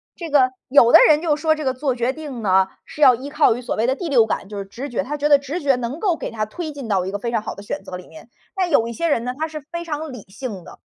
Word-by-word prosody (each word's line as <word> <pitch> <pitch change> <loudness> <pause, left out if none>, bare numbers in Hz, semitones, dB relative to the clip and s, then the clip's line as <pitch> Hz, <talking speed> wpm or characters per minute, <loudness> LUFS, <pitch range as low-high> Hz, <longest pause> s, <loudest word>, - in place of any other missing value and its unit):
这 330 -4 -7
个， 260 -3 +5 0.2
有 240 -3 +6
的 - - +10
人 305 0 +4
就 310 -4 +1
说 315 +1 +2
这 310 -1 -5
个 260 - +1
做 265 0 -1
决 240 +1 0
定 280 -5 -7
呢， 190 -2 +3 0.2
是 - - -13
要 255 -2 +8
依 265 +4 -6
靠 300 -5 +3
于 245 - -6
所 - - -3
谓 220 - 0
的 260 +1 +1
第 345 0 -5
六 240 -6 +5
感， 210 - -3
就 210 - -7
是 200 - -4
直 255 +8 -7
觉， 240 - -2
他 295 +3 -4
觉 295 +1 0
得 285 - +7
直 280 +5 -5
觉 275 -2 +3
能 250 +4 -4
够 370 -4 +1
给 - - -5
他 215 -2 -3
推 315 +5 -6
进 275 -5 -8
到 190 -4 0
一 190 - -4
个 205 - -4
非 235 +3 -3
常 220 -2 -1
好 - - -5
的 200 - -11
选 245 +8 -5
择 180 - -8
里 180 - -10
面。 160 +8 -14 0.3
但 370 -3 -1
有 230 -6 +3
一 235 - -5
些 335 +7 -1
人 235 -7 +1
呢， 250 +1 -4
他 315 +1 -2
是 310 -1 -7
非 340 0 -5
常 310 -2 -4
理 245 -5 -9
性 210 -5 -6
的， - - -14
265 Hz, 345 characters per minute, -21 LUFS, 230-300 Hz, 0.3 s, 的